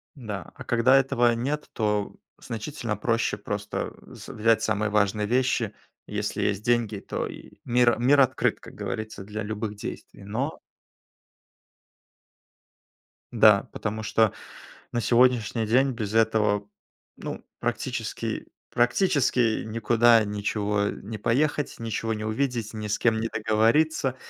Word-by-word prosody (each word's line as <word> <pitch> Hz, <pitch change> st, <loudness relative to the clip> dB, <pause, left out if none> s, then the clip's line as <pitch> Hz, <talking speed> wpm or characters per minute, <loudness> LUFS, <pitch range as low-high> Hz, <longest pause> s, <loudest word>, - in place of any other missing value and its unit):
Да, 105 Hz, -, -7 dB
а -, -, -9 dB
когда 120 Hz, +3 st, +4 dB
этого 120 Hz, -3 st, +3 dB
нет, 145 Hz, +6 st, -3 dB
то 105 Hz, -2 st, -1 dB, 0.3 s
значительно 115 Hz, -2 st, -4 dB
проще 115 Hz, -1 st, 0 dB
просто, 105 Hz, 0 st, -4 dB
э, -, -, -12 dB
с -, -, -11 dB
взять 110 Hz, 0 st, +2 dB
самые 110 Hz, -1 st, 0 dB
важные 105 Hz, 0 st, +1 dB
вещи. 125 Hz, -3 st, +1 dB, 0.3 s
Если -, -, -3 dB
есть 100 Hz, 0 st, 0 dB
деньги, 120 Hz, -3 st, +1 dB
то -, -, -4 dB
и -, -, -11 dB
мир 120 Hz, -2 st, +3 dB
мир 140 Hz, +4 st, +4 dB
открыт, 130 Hz, -2 st, +2 dB
как -, -, -13 dB
говорится, 110 Hz, -2 st, -5 dB
для 105 Hz, +2 st, -5 dB
любых 105 Hz, 0 st, -4 dB
действий, 100 Hz, -1 st, -8 dB
но 125 Hz, +10 st, -3 dB, 2.7 s
Да, -, -, +5 dB
потому 110 Hz, +1 st, -4 dB
что 110 Hz, 0 st, +2 dB, 0.6 s
на 120 Hz, -, 0 dB
сегодняшний 120 Hz, -2 st, +3 dB
день 130 Hz, +5 st, +3 dB
без 110 Hz, -3 st, -4 dB
этого, 105 Hz, -2 st, +2 dB, 0.5 s
ну, -, -, -7 dB, 0.2 s
практически, -, -, -3 dB, 0.2 s
практически 120 Hz, -, +2 dB
никуда 115 Hz, +1 st, +4 dB
ничего 105 Hz, 0 st, -1 dB
не 110 Hz, +2 st, -6 dB
поехать, 145 Hz, +7 st, 0 dB
ничего 115 Hz, 0 st, -2 dB
не 110 Hz, 0 st, -4 dB
увидеть, 115 Hz, -1 st, -2 dB
ни 105 Hz, -1 st, -4 dB
с 105 Hz, -, 0 dB
кем 115 Hz, -2 st, +2 dB
не 115 Hz, -, -1 dB
договориться, 115 Hz, +6 st, +2 dB
110 Hz, 130 wpm, -26 LUFS, 105-120 Hz, 2.7 s, Да